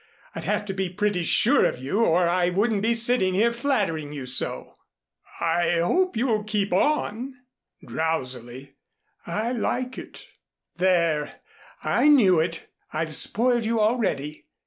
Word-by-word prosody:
"I'd - - -7
have 210 - -1
to 195 - -4
be 190 -1 -2
pretty 205 0 -1
sure 235 - +3
of - - +1
you, 140 - -1
or 175 -2 +3
I 175 0 +1
wouldn't 205 +3 0
be 230 +2 +1
sitting 230 -5 +2
here 230 +4 +3
flattering 205 - -1
you 140 -3 -6
so." 125 +1 -3 0.7
"I 170 +1 +1
hope 360 - +1
you'll 225 -3 0
keep 205 -3 -1
on," 255 +2 0 0.5
drowsily. 130 -4 -3 0.6
"I 215 +7 -2
like 250 +1 -2
it." - - -11 0.5
"There! 170 -5 +1 0.4
I - - +2
knew 210 - +5
it. 165 +1 -2 0.3
I've 155 0 -3
spoiled 240 +7 +2
you 225 +1 0
already. 210 - -1
195 Hz, 140 wpm, -24 LUFS, 165-230 Hz, 0.7 s, knew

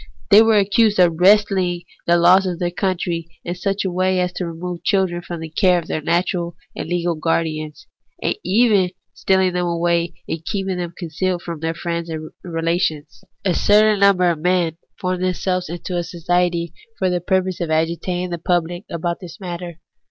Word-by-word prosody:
They 210 - +9
were 225 -1 +4
accused 205 +2 +3
of 175 -3 +3
wresting 190 -2 +3 0.2
the 170 0 +5
laws 185 +3 +5
of 180 -2 -2
their 175 -1 -1
country 175 -2 -2 0.2
in 175 - -2
such 195 +2 -2
a 190 - -1
way 185 +1 +1
as 180 -1 0
to 180 -1 -3
remove 170 +1 -6
children 190 -4 +1
from 170 -1 -7
the 160 - -6
care 180 +1 +3
of 170 - -3
their 155 - -3
natural 170 +1 0 0.2
and - - -5
legal 175 -1 0
guardians; 155 -1 -2 0.3
and - - -1
even 205 0 +4
of 180 - -7 0.2
steahng 190 -1 +2
them 180 0 0
away 170 0 0
and 165 - -4
keeping 195 0 -2
them 175 -1 -5
concealed 175 +1 -2
from 170 -2 -5
their 165 +1 -2
friends 170 0 -3
and 155 -1 -6
relations. 165 -3 -2 0.2
A 185 - +3
certain 210 +2 +4
number 185 -3 +4
of 165 - -4
men 175 -1 +1 0.2
formed 185 0 -2
themselves 185 -1 -1
into 175 +2 -5
a 175 - 0
society 170 0 -1 0.2
for 190 - +1
the 180 -1 -1
purpose 185 0 0
of 170 - -2
agitating 170 +3 -1
the 170 - -3
pubhc 175 +2 -1
about 170 +1 -3
this 180 -4 -10
matter. 175 -3 -6
175 Hz, 185 wpm, -20 LUFS, 170-185 Hz, 0.3 s, They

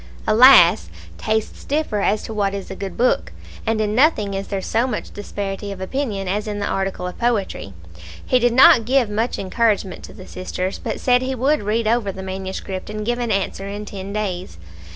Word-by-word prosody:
Alas! 215 - +7 0.3
tastes 220 0 -2
differ 285 -7 -1
as 205 +2 +1
to 225 - -6
what 200 -2 0
is 195 -1 -6
a - - -5
good 195 0 -6
book, 250 +1 +1 0.4
and 225 0 +1
in 210 -1 0
nothing 225 -6 +3
is 195 0 -4
there 195 - -2
so 225 +6 0
much 255 - -4
disparity 200 0 -5
of 195 - -7
opinion 200 -1 -3
as 205 +3 -2
in 210 -1 -3
the 205 - -2
article 190 -2 -2
of 180 - -6
poetry. 210 - -1 0.5
He 255 - +3
did 240 -1 +2
not 260 -2 +7
give 250 -3 +2
much 225 +4 -1
encouragement 205 -1 0
to - - -13
the 185 - -12
sisters, 185 +1 -4
but - - -4
said 250 -1 +3
he 260 +1 -2
would 275 +5 +1
read 215 +2 -1
over 225 -3 +1
the 190 0 -8
manuscript 190 0 -5
and 215 0 -5
give 240 +1 -1
an 240 -1 -2
answer 195 0 -2
in 205 +1 -6
ten 195 -1 -7
days. 190 - -4
210 Hz, 200 wpm, -21 LUFS, 195-235 Hz, 0.5 s, Alas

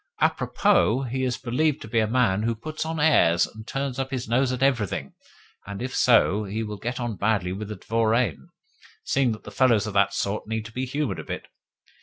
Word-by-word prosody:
A - - +4
propos, 125 +3 +1
he 130 +1 -1
is 125 -1 0
believed 140 +5 0
to - - -8
be 115 +1 +1
a 110 - +2
man 110 -4 +2
who 115 +1 0
puts 155 +7 -5
on 160 -1 -3
airs, 85 - +4
and 110 0 -12
turns 135 -1 -3
up 135 0 -2
his 130 -4 -4
nose 125 +3 +2
at 130 +1 -1
everything; 120 -8 0 0.5
and 100 -1 -6
if 130 +1 -4
so, 110 -4 +4
he 105 +3 -3
will 105 -1 -5
get 125 +5 -4
on 120 -4 -3
badly 100 -3 0
with 100 +3 -5
the 105 - -5
dvoriane, 110 - 0 0.6
seeing 135 -3 +1
that 105 -1 -10
fellows 115 -3 +3
of 110 - -5
that 100 0 +3
sort 100 +2 -2
need 110 0 -3
to 115 - -9
be 130 +3 -3
humoured 135 -6 -2
a - - -5
bit. - - -6
115 Hz, 215 wpm, -25 LUFS, 105-130 Hz, 0.6 s, A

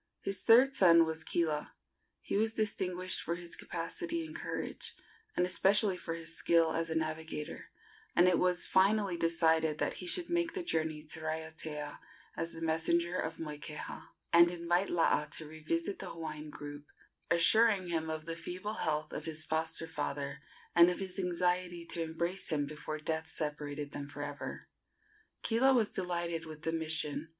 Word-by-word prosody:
His 195 -1 -1
third 250 +4 +6
son 170 -8 +7
was 160 0 -3
Kila. 155 -3 -1 0.5
He - - -2
was 220 +2 +1
distinguished 185 -4 0
for 170 - -2
his 175 -1 -5
capacity 330 - -4
and 315 +1 -10
courage, - - -4 0.4
and 180 - +4
especially 195 +2 +3
for 165 -2 -5
his 165 -1 -4
skill 165 -1 +3
as 165 0 -1
a 160 - -2
navigator, 160 -1 -4 0.5
and 175 +1 +6
it 180 - +4
was 180 -1 +3
finally 195 0 +3
decided 160 -2 +2
that - - 0
he 180 - -5
should 345 - +2
make 345 -1 0
the 370 - -2
journey 160 - -1
to 155 +1 -7
Raiatea 160 -2 -4 0.4
as 165 0 -2
the 165 - -8
messenger 170 +2 +1
of 160 -2 -2
Moikeha, 150 -1 -6 0.3
and 170 0 +8
invite 175 +2 0
Laa 165 -3 +2
to 150 +1 -4
revisit 160 +4 -3
the - - -5
Hawaiian 155 -2 -6
group, 145 0 -8 0.4
assuring 195 +2 +5
him 160 -1 -1
of 155 0 -4
the 165 0 -3
feeble 185 +5 -5
health 155 -1 -1
of - - -5
his 155 -1 +2
foster 160 +1 +1
father 140 -2 -4 0.3
and 170 0 +8
of 180 - -1
his 190 0 -4
anxiety 180 -1 0
to 170 - -3
embrace 170 +3 -2
him 150 -3 0
before 155 +1 -5
death 160 +1 -3
separated 150 -2 -3
them 140 -1 -5
for 145 0 -6
ever. 145 0 -6 0.8
Kila 260 +4 +4
was 225 -4 +3
delighted 170 -2 -2
with 155 -1 -9
the 165 - 0
mission. 160 -1 -1
165 Hz, 165 wpm, -33 LUFS, 155-180 Hz, 0.8 s, and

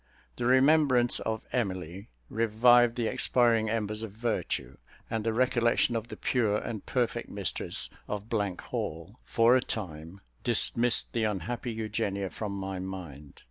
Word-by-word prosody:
The 120 - -1
remembrance 130 -2 +4
of 110 -1 -3
Emily 95 -5 -3 0.2
revived 115 - +4
the 120 -2 -1
expiring 115 -1 +2
embers 105 -1 -2
of 110 -3 -6
virtue; 115 +1 -2 0.3
and 110 -2 -1
the 115 - +1
recollection 120 0 +2
of 115 0 -2
the - - -8
pure 110 -5 +1
and 110 -1 -5
perfect 120 -2 -1
mistress 100 -6 -1 0.2
of 105 -1 -4
Hall, 100 -2 -3
for 115 +2 +4
a 130 - +4
time, 85 -4 -6 0.2
dismissed 120 +1 +1
the 115 -2 +1
unhappy 110 +5 -3
Eugenia 105 -3 -2
from 105 -2 -4
my 95 -1 -4
mind. 85 -7 -8
110 Hz, 140 wpm, -29 LUFS, 100-120 Hz, 0.3 s, remembrance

